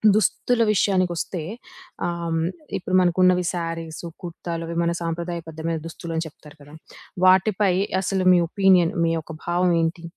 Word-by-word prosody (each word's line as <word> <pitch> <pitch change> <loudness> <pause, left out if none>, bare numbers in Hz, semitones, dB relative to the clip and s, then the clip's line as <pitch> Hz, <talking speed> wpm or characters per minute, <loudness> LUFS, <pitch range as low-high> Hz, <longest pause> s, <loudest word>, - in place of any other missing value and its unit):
దుస్తుల 230 +3 +1
విషయానికోస్తే 185 -3 0 0.7
ఆహ్, 170 -1 -2 0.4
ఇప్పుడు 185 0 -2
మనకున్నవి 180 0 +3
సరీస్, 165 -1 -5 0.2
కుర్తాలవి 170 -1 -5
మన 170 - +1
సంప్రదాయబద్ధమైన 165 -1 -4
దుస్తులు 165 0 -7
అని 165 - -1
చెప్తారు 150 -1 -15
కదా! 145 +1 -15 0.5
వాటిపై 190 +1 +4 0.3
అసలు 190 0 -1
మీ 180 - +5
ఒపీనియన్ 190 -2 +4
మీ 165 - +1
యొక్క 160 0 -7
భావం 175 +1 +2
ఏంటి? 165 +1 -2
170 Hz, 125 wpm, -23 LUFS, 165-185 Hz, 0.7 s, మీ